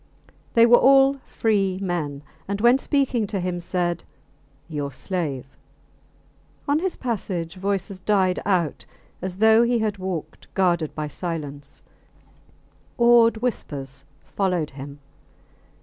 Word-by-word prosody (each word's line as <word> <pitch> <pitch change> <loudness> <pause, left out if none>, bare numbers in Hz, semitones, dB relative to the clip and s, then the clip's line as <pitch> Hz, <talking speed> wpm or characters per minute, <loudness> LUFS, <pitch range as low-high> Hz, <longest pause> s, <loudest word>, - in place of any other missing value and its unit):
They 230 0 +7
were 240 +1 +7
all 270 +1 +5
free 195 -4 0
men, 160 -7 -3 0.2
and 200 +1 -2
when 240 +4 +5
speaking 265 -7 0
to 195 -1 -3
him 180 -1 -2
said, 175 -1 -2 0.6
Your 145 -3 -4
slave. 145 -5 -3 1.2
On 285 +2 +2
his 370 +1 -2
passage 185 -8 -3
voices 195 0 -2
died 190 -2 +1
out 175 -7 0 0.4
as 185 0 -4
though 220 +2 +6
he 240 0 +2
had 215 -3 -1
walked 185 -4 -6
guarded 175 -5 +1
by 150 -1 -3
silence; 150 -4 -6 1.1
awed 235 -2 +5
whispers 140 - -4 0.2
followed 180 -6 -1
him. 140 +1 -9
185 Hz, 120 wpm, -23 LUFS, 165-230 Hz, 1.2 s, They